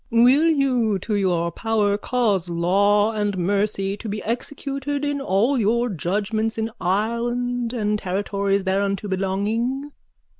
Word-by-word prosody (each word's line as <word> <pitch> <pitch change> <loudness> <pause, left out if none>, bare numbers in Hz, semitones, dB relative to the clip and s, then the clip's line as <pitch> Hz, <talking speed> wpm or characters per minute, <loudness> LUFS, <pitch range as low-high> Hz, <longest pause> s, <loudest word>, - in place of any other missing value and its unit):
_ 230 0 +5
Will 270 +6 +5
you 255 -9 +2
to 210 +4 -4
your 175 -4 +1
power 215 -2 +1
cause 205 -5 0
law 200 +5 +3
and 205 -3 -1
mercy 195 +1 0
to 220 - -7
be 210 +1 -4
executed 275 +4 -3
in 285 -1 -1
all 240 +4 +2
your 235 +3 +1
judgments 210 +5 -1
in 225 0 -2
Ireland 235 +5 -1
and 210 -3 -1
territories 200 +1 -1
thereunto 195 +1 -1
belonging? 215 +9 -1
210 Hz, 135 wpm, -22 LUFS, 195-240 Hz, -, _